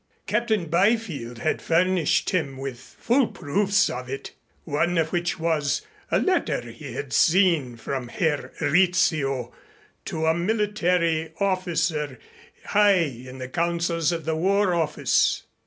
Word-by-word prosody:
Captain 215 -2 0
Byfield 170 - 0
had 155 - -1
furnished 175 -1 +2
him 145 -8 -1
with 135 -2 -6
full 240 - 0
proofs 195 +5 +1
of 125 0 -5
it, 135 +1 -6 0.3
one 170 +3 0
of 160 -1 +1
which 175 -2 -1
was 160 -3 0 0.3
a - - +2
letter 380 -1 0
he - - -9
had 435 - -5
seen 165 -8 +3
from 130 +1 -4
Herr 150 +3 -1
Rizzio 155 -6 +2 0.5
to 160 0 -2
a 160 - +4
military 175 -4 0
officer 165 -7 -1 0.5
high 205 0 +4
in 130 -7 -2
the 130 -1 -6
councils 170 +2 0
of 165 -3 -4
the 160 0 0
War 190 +3 +2
Office. 160 -3 +1
165 Hz, 130 wpm, -24 LUFS, 145-185 Hz, 0.5 s, a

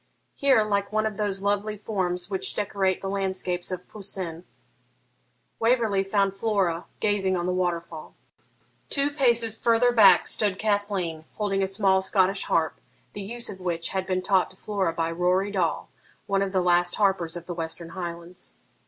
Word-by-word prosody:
Here, 265 -6 +4
like 200 -1 -1
one 215 0 +1
of 215 -2 -3
those 200 -2 -1
lovely 205 +1 0
forms 180 -4 -2
which 190 -1 -2
decorate 195 -2 0
the 195 - -4
landscapes 190 -2 -2
of 180 -1 -5
Poussin, 185 -4 -5 1.1
Waverley 225 -4 +2
found 195 0 +1
Flora 195 -5 0
gazing 195 -3 +1
on 175 - -2
the 180 - 0
waterfall. 170 -3 -3 0.7
Two 280 0 0
paces 235 -6 +2
further 235 +1 +4
back 200 -6 +6
stood 205 -3 0
Cathleen, 205 -6 -1
holding 200 -2 0
a 190 - +1
small 190 -1 +2
Scottish 190 0 +2
harp, 160 -1 0 0.3
the 205 - -6
use 235 +4 -2
of 190 - -6
which 170 -2 -2
had 190 -1 -2
been 185 -1 -1
taught 190 -1 +2
to - - -17
Flora 195 -5 -1
by 165 0 -1
Rory 180 +4 +1
Dall, 180 -5 -1 0.3
one 195 -1 +1
of 195 -1 -1
the 185 -1 +2
last 175 0 +3
harpers 185 -5 +1
of 170 - -9
the 175 - -5
Western 165 0 -5
Highlands. 170 0 -7
195 Hz, 165 wpm, -26 LUFS, 180-205 Hz, 1.1 s, back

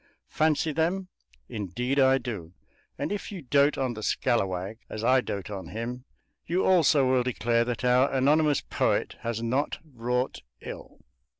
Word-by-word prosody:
Fancy 155 0 +1
them? 175 +5 -1 0.4
Indeed 120 +7 -2
I 135 0 +5
do; 100 -11 -6 0.4
and - - -3
if 205 0 -4
you 185 -6 -7
dote 140 +2 +3
on 130 -2 -1
the 110 - -7
"scallawag" 100 -1 0
as 110 - -5
I 130 +2 +4
dote 100 -3 -5
on 95 -4 -6
him 120 +6 -5 0.4
you 180 +3 +1
also 155 -7 +4
will 130 -1 +3
declare 120 -1 +1
that 120 0 -3
our 125 +2 +4
anonymous 145 +2 +3
poet - - 0
has 115 0 -3
not 130 +6 0 0.2
wrought 125 +2 -1 0.2
ill. - - -9
125 Hz, 155 wpm, -27 LUFS, 115-145 Hz, 0.4 s, I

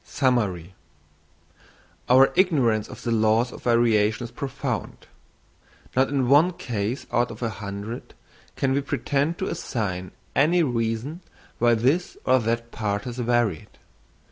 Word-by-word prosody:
Summary.—Our 120 - -2
ignorance 130 - +2
of - - -10
the 120 - -1
laws 110 +2 +2
of - - -10
variation 115 -2 +2
is 120 - -7
profound. 135 -3 -4 0.9
Not 130 +1 +3
in 135 -3 0
one 150 +7 +5
case 115 -4 -3
out 120 0 +2
of 115 +2 -8
a 115 - 0
hundred 100 +2 -7 0.4
can 135 -1 0
we 140 - +1
pretend 145 +3 -1
to 190 - -2
assign 95 - -3 0.3
any 170 +5 +4
reason 120 +5 -2 0.4
why 120 0 +4
this 135 +11 0
or 130 0 +4
that 115 0 -2
part 105 -2 -2
has 125 -1 -6
varied. 120 -8 0
120 Hz, 130 wpm, -24 LUFS, 110-135 Hz, 0.9 s, one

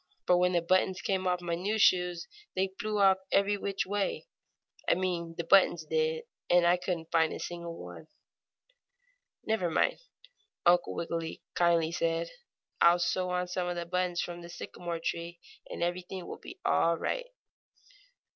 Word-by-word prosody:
"For 180 - +5
when 180 +1 +3
the 170 -1 +2
buttons 185 +1 +2
came 190 -1 -1
off 180 0 +1
my 175 -1 -3
new 195 +6 -1
shoes 180 -4 +3 0.3
they 190 0 0
flew 215 -2 0 0.3
every 200 +1 +3
which 200 -1 -2
way 205 - -2 0.6
I - - +5
mean 175 -3 -2
the 170 - -2
buttons 175 -2 +4
did 160 0 0 0.3
and 175 0 +5
I 175 +1 +5
couldn't 175 -2 -4
find 160 -1 +3
a - - -5
single 170 -1 -6
one." 90 - -10 1.4
"Never 220 -6 0
mind," 160 - +1 0.7
Uncle 175 0 +4
Wiggily 165 -1 -4
kindly 170 -2 +3
said. 165 0 -1 0.5
"I'll 170 +1 +7
sew 180 +1 0
on 180 0 -1
some 180 0 -2
of 175 - -2
the 170 0 -3
buttons 180 0 0
from 175 0 -5
the 170 - -10
sycamore 175 -1 -6
tree, 170 +1 -4 0.3
and - - -3
everything 180 +1 -3
will - - -8
be 370 - -11
all 170 0 +3
right." - - -2
175 Hz, 160 wpm, -30 LUFS, 170-185 Hz, 1.4 s, I'll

